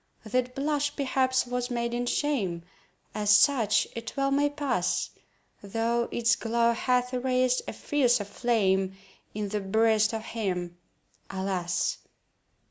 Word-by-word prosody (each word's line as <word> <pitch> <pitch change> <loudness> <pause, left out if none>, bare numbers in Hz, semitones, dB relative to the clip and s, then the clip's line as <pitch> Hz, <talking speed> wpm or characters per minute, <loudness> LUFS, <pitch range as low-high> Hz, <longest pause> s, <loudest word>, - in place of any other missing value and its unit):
That 250 +3 -1
blush, 290 +1 -1
perhaps, 260 -2 +1
was 245 0 -3
maiden 240 0 -2
shame— 215 - -1 0.5
As 210 -1 -2
such 215 -1 +4
it 230 +3 -7
well 275 0 +1
may 290 +1 +3
pass— 280 -11 -1 0.5
Though 230 +3 -1
its 230 -1 +2
glow 235 +1 +1
hath 250 +1 0
raised 255 0 +1
a - - -4
fiercer 245 -7 +1
flame 195 -4 0 0.4
In 210 -1 -3
the 210 +1 -1
breast 220 +2 +2
of 220 -1 -4
him, 180 -6 -3 0.5
alas! 185 -2 -1
235 Hz, 125 wpm, -27 LUFS, 205-255 Hz, 0.5 s, such